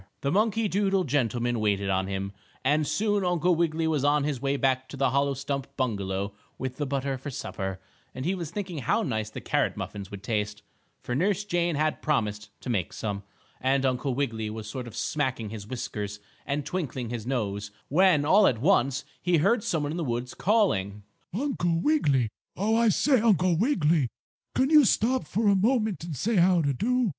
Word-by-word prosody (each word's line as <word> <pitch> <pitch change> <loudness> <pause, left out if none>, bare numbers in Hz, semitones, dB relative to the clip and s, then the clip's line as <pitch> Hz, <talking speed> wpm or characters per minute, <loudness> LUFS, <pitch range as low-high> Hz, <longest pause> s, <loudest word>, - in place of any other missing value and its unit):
The 140 - 0
monkey 220 +2 +2
doodle 195 -1 +1
gentleman 120 - 0
waited 100 -2 +1
on 95 0 0
him, 100 0 -3 0.3
and 150 +2 +3
soon 205 +5 +1
Uncle 180 0 +2
Wiggily 165 -1 +1
was 155 -4 +1
on 145 0 +3
his 140 -4 -2
way 140 0 0
back 130 -1 +1
to 140 - -8
the 135 -2 +2
hollow 140 0 +1
stump 140 0 -3
bungalow 100 -5 -1 0.2
with 130 0 -4
the 145 - -2
butter 135 -1 -2
for 145 - -6
supper, 95 -7 -4 0.4
and 130 +2 -4
he 180 - +1
was 170 -5 -4
thinking 180 -3 -4
how 125 - +1
nice 110 -4 -2
the - - -7
carrot - - 0
muffins 100 -2 -6
would 100 -1 -9
taste, 105 -1 -2 0.4
for 125 - -3
Nurse 195 +9 +1
Jane 175 -4 0
had 155 +1 0
promised 105 -8 -1
to - - -6
make 95 -6 -1
some, 100 -2 -3 0.4
and 135 +1 +2
Uncle 130 0 0
Wiggily 115 -6 -1
was 110 0 -6
sort 125 +3 -5
of 115 - -10
smacking 130 -8 -1
his 105 -2 -7
whiskers 105 -4 -4 0.3
and 145 0 -1
twinkling 130 -10 -3
his 120 -2 -5
nose, 105 -6 -2 0.2
when, 160 -2 +4
all 195 +6 +6
at 120 - +2
once, 135 - +2 0.2
he 175 -1 +3
heard 205 +8 +3
some 160 -3 0
one 145 - -2
in 165 - -3
the 170 - -1
woods 120 -2 -3
calling: 105 - +1 0.3
"Uncle 175 -8 0
Wiggily! 145 - +2 0.3
Oh, 215 +4 +2
I 230 0 +4
say, 260 +3 +3
Uncle 185 -6 +3
Wiggily! 165 - +2 0.5
Can't 265 +3 +2
you 305 -2 +8
stop 250 +2 +2
for 220 +1 0
a 200 - +5
moment 215 -2 +1
and 165 -3 -5
say 225 - 0
how 175 -1 +4
d' 140 -2 +1
do?" 250 - +1
140 Hz, 195 wpm, -27 LUFS, 120-185 Hz, 0.5 s, you